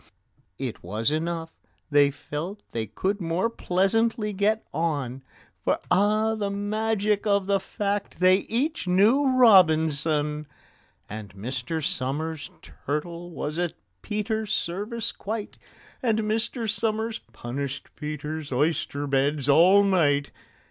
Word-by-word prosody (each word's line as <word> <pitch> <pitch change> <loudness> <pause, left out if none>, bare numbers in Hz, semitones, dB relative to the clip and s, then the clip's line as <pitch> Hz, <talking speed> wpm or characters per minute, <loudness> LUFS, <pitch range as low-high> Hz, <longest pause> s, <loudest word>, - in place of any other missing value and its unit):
It 130 -4 -5
was 105 +8 -1
enough: 165 +1 -2 0.4
they 145 -1 +5
felt 165 +8 -6
they 110 -1 -3
could 190 - -2
more 175 +7 0
pleasantly 210 +3 +1
get 210 +3 +1
on, 140 -5 -2 0.4
For - - +2
(ah, 215 +3 +3
the 210 -2 -2
magic 210 +1 0
of 200 -1 +2
the 200 0 +2
fact!) 200 +1 -3
they 185 +1 +5
each 245 - -2
knew 215 +10 +4
ROBINSON! 155 - +4 0.6
And 105 -2 -8
Mr. 130 +8 -3
SOMERS' 145 +4 -2
turtle 170 +4 -5
was 155 -1 -4
at 175 -2 0 0.3
PETER'S 215 0 -2
service 210 +6 -1
quite, 215 0 -5 0.4
And 225 -4 +1
Mr. 225 +2 -1
SOMERS 220 +1 0
punished 135 +3 -5
PETER'S 150 0 -5
oyster 145 +1 0
beds 140 +1 +1
all 180 +8 +6
night. 145 -8 +2
175 Hz, 115 wpm, -26 LUFS, 145-210 Hz, 0.6 s, all